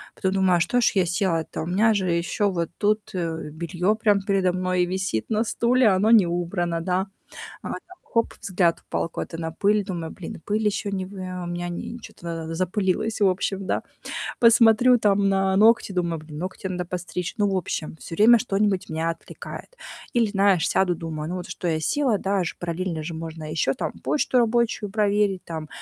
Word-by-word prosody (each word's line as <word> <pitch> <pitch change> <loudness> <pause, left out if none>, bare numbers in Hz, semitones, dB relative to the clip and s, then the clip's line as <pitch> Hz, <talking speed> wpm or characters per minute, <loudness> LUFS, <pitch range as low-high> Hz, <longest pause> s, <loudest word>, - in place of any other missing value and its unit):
Потом 190 - 0
думаю: 185 -3 +3
"Что 245 +7 +2
ж 240 - +3
я 190 -2 +3
села-то, 170 -3 -1
у - - -4
меня 205 +6 +3
же 190 -3 0
ещё 170 +5 0
вот 170 -3 -2
тут, 210 +1 0
э, 165 -4 -3
бельё, 170 +6 0
прям, 210 -2 +2
передо 195 -2 +1
мной 185 0 +1
висит 185 - -2
на 220 0 +2
стуле, 240 +2 +2
а, 190 - +3
оно 210 +4 +3
не 215 -6 +7
убрано, 175 0 -1
да". 185 +3 -1 0.5
А, - - -6
там - - -3 0.3
хоп 230 0 0
взгляд 175 -3 +1
упал - - -3
куда-то 165 - -5
на 165 -1 -4
пыль, 205 +4 +2
думаю: 170 -4 -4
"Блин, 175 - -8
и - - -15
пыль 210 +5 -1
ещё 205 0 0
не 190 -2 -2
вы 190 -1 -7
ам, 180 -1 -5
у - - -3
меня 175 0 -3 0.3
чё-то 175 - -13
на 170 -1 -3
надо 165 0 -5
запылилось, 190 +4 0
в 200 - +6
общем, 190 +1 -1
да". - - 0 0.6
Посмотрю 235 +1 +6
там 200 -2 +3
на 195 0 +2
ногти, 220 0 +5
думаю: 170 -3 -1
"Блин, 155 -1 -10
ногти 185 +3 -5
надо 180 -1 -3
постричь". 180 0 -4
Ну, 205 -2 +2
в 190 - 0
общем, 160 -3 -3
всё - - -7
время 225 +6 +7
что-нибудь 205 -4 0
меня 160 +1 -1
отвлекает. 335 - -9 0.4
Или, 235 -2 +4
знаешь, 195 -4 +3
сяду, 180 -2 +2
думаю: 160 -2 -5
"Ну, 180 - -3
вот, 180 -1 -6
что 180 0 -4
я 160 -1 0
села, 265 - +1
да, 195 +1 0
аж 175 - -3
параллельно 170 -1 -3
же 165 +2 -5
можно 160 0 -6
ещё, 155 -4 +1
там, - - -3
почту 270 -3 +1
рабочую 230 -3 +1
проверить, 205 -2 +1
там, 160 -2 -6
185 Hz, 200 wpm, -24 LUFS, 170-210 Hz, 0.6 s, не